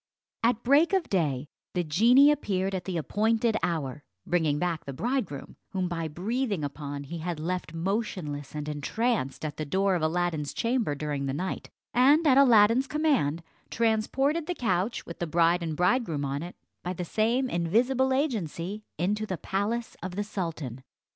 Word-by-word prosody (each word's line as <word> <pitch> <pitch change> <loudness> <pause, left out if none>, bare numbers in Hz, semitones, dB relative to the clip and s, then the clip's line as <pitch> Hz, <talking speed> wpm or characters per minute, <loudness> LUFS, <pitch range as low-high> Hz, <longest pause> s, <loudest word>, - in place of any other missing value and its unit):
At 230 0 +2
break 290 +9 +4
of 380 -4 +1
day, 150 -8 +1 0.3
the 180 - +1
genie 235 - +6
appeared 195 -9 -1
at 185 -2 -3
the 185 -3 -2
appointed 220 +7 +1
hour, 150 -5 -2 0.2
bringing 160 -4 +1
back 170 0 -1
the 140 - -5
bridegroom, 195 - -3 0.2
whom 185 -1 0
by 165 -2 -3
breathing 200 - -2
upon 145 0 -5
he 165 +4 -6
had 170 -1 -3
left 170 0 -3
motionless 165 -6 -3
and 150 0 -4
entranced 150 - -1
at 150 -1 -5
the 155 - -2
door 190 +6 +1
of 175 - 0
Aladdin's 160 -2 -1
chamber 230 - 0
during 145 -1 -3
the 135 - -2
night, 185 +5 -4 0.2
and 285 +6 +5
at 275 -2 +6
Aladdin's 240 0 +6
command 265 - +1 0.3
transported 260 +8 +1
the 355 - -2
couch 195 - -1
with 170 - -9
the 175 - -2
bride 170 +2 +3
and 160 -2 -3
bridegroom 180 - +1
on 140 +1 -2
it, 175 +2 -7 0.3
by 180 - -3
the 180 0 -4
same 230 +8 +1
invisible 245 +9 +2
agency, 210 - -2
into 210 +6 0
the 185 - -3
palace 215 +7 -2
of 180 0 -5
the 205 - -1
sultan. 165 - -5
185 Hz, 165 wpm, -28 LUFS, 155-235 Hz, 0.3 s, genie